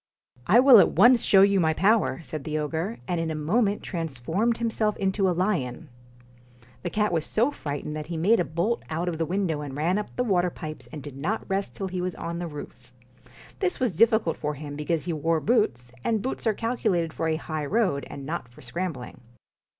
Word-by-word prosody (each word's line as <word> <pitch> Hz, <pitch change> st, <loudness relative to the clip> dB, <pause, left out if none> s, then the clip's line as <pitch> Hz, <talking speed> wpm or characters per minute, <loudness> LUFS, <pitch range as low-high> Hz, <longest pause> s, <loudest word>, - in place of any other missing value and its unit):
' 125 Hz, 0 st, -26 dB
I 215 Hz, +7 st, +6 dB
will 255 Hz, -3 st, +9 dB
at -, -, +4 dB
once 240 Hz, -1 st, +6 dB
show 195 Hz, -1 st, +6 dB
you 200 Hz, -1 st, +4 dB
my 160 Hz, -2 st, +2 dB
power,' 210 Hz, -1 st, +2 dB
said 155 Hz, -2 st, -6 dB
the 155 Hz, +1 st, -2 dB
ogre; 160 Hz, +8 st, -2 dB
and 175 Hz, -2 st, -1 dB
in 165 Hz, -1 st, -1 dB
a 160 Hz, -, -2 dB
moment 200 Hz, +7 st, +1 dB
transformed 165 Hz, -, -1 dB
himself 225 Hz, -2 st, 0 dB
into 195 Hz, 0 st, +1 dB
a 175 Hz, -, -1 dB
lion. 165 Hz, -7 st, -1 dB, 0.9 s
The 175 Hz, -, -3 dB
cat 210 Hz, +2 st, 0 dB
was 165 Hz, -3 st, 0 dB
so 235 Hz, -, +1 dB
frightened 145 Hz, -, -5 dB
that 155 Hz, -1 st, -5 dB
he 170 Hz, -1 st, -4 dB
made 205 Hz, +8 st, +3 dB
a -, -, +3 dB
bolt 175 Hz, +9 st, -1 dB
out 165 Hz, +3 st, -2 dB
of 165 Hz, -2 st, -2 dB
the 165 Hz, -, 0 dB
window 175 Hz, -5 st, -1 dB
and 140 Hz, -2 st, -6 dB
ran 175 Hz, +7 st, +1 dB
up 210 Hz, -, -5 dB
the 250 Hz, -, +1 dB
water 180 Hz, -6 st, +2 dB
pipes 155 Hz, -3 st, -8 dB
and 150 Hz, -3 st, -7 dB
did 145 Hz, -3 st, -9 dB
not 175 Hz, +11 st, -3 dB
rest 195 Hz, 0 st, -2 dB
till 195 Hz, -, -3 dB
he 180 Hz, 0 st, -3 dB
was 180 Hz, 0 st, -3 dB
on 170 Hz, 0 st, -5 dB
the 175 Hz, -, -3 dB
roof. 135 Hz, -5 st, -10 dB, 0.7 s
This 375 Hz, -2 st, 0 dB
was 245 Hz, -, 0 dB
difficult 220 Hz, -3 st, +3 dB
for 150 Hz, 0 st, -3 dB
him, 145 Hz, 0 st, -7 dB
because 150 Hz, +2 st, -2 dB
he 175 Hz, -, -1 dB
wore 160 Hz, +1 st, +1 dB
boots, 150 Hz, -, +1 dB
and 220 Hz, -3 st, 0 dB
boots 260 Hz, -2 st, -3 dB
are 215 Hz, -, +2 dB
calculated 185 Hz, -9 st, -1 dB
for 165 Hz, -, -2 dB
a 160 Hz, -, +1 dB
high 155 Hz, -2 st, -4 dB
road, 190 Hz, -8 st, 0 dB
and 140 Hz, -, -8 dB
not 160 Hz, -3 st, -4 dB
for 120 Hz, -, -16 dB
scram 170 Hz, +8 st, -3 dB
bling. 125 Hz, -2 st, -10 dB
175 Hz, 220 wpm, -26 LUFS, 155-210 Hz, 0.9 s, will